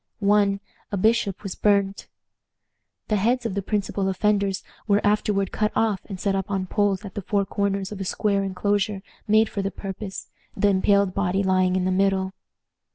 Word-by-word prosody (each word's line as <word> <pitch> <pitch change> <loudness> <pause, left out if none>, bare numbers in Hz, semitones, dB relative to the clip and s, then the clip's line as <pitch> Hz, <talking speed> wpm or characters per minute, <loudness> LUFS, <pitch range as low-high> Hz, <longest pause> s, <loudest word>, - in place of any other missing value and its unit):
One, 200 -1 +2 0.3
a 200 - -1
bishop, 215 -1 +1
was 195 -3 -4
burnt. 200 -1 +1 1.0
The 215 - +2
heads 235 +5 +1
of 225 - -1
the 200 - -1
principal 195 -1 -1
offenders 200 0 +1 0.2
were 205 -1 +4
afterward 205 -2 +1
cut 215 0 0
off 220 -3 +2
and 195 -3 -7
set 200 +1 0
up 195 +1 -2
on 190 -2 -1
poles 205 +1 0
at 195 - -8
the 205 - -4
four 200 +1 0
corners 200 0 -1
of 200 -2 -6
a - - 0
square 200 +1 0
inclosure 200 +1 -1 0.2
made 215 +1 +5
for 200 - -3
the 195 - -1
purpose, 195 0 -7 0.3
the 205 +1 +3
impaled 200 0 +3
body 195 0 0
lying 185 -1 +2
in 185 -1 +1
the 185 - +1
middle. 190 0 +1
200 Hz, 180 wpm, -24 LUFS, 190-205 Hz, 1.0 s, made